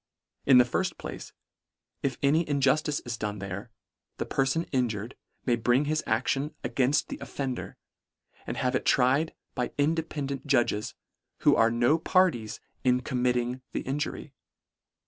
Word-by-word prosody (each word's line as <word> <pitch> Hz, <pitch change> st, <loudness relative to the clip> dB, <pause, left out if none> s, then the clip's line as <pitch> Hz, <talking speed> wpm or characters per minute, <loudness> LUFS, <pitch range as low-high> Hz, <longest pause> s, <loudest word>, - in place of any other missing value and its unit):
In 135 Hz, -2 st, +8 dB
the 125 Hz, -, +8 dB
firft 120 Hz, -, -1 dB
place, -, -, -7 dB, 0.7 s
if 135 Hz, -3 st, -1 dB
any 155 Hz, +3 st, +3 dB
injustice 145 Hz, +1 st, +2 dB
is 120 Hz, -1 st, -5 dB
done 105 Hz, -1 st, -3 dB
there, 100 Hz, +3 st, -6 dB, 0.5 s
the -, -, -2 dB
perfon 135 Hz, +5 st, 0 dB
injured 120 Hz, -3 st, -1 dB, 0.3 s
may 120 Hz, -, +3 dB
bring 120 Hz, +4 st, +2 dB
his 155 Hz, +1 st, 0 dB
action 135 Hz, +6 st, 0 dB
againft 135 Hz, +3 st, +2 dB
the -, -, -5 dB
offender, 130 Hz, -3 st, -4 dB, 0.7 s
and -, -, -3 dB
have 125 Hz, 0 st, 0 dB
it -, -, 0 dB
tried 135 Hz, +5 st, +3 dB, 0.2 s
by 125 Hz, -2 st, -1 dB
independant 145 Hz, -2 st, -1 dB
judges, 120 Hz, -6 st, +1 dB, 0.5 s
who -, -, +5 dB
are 115 Hz, -, +5 dB
b 115 Hz, -, -3 dB
no 120 Hz, +7 st, +4 dB
parties 160 Hz, -, +2 dB, 0.2 s
in 125 Hz, 0 st, +3 dB
committing 125 Hz, 0 st, 0 dB
the -, -, -1 dB
injury. 145 Hz, +1 st, -4 dB
130 Hz, 145 wpm, -28 LUFS, 120-145 Hz, 0.7 s, In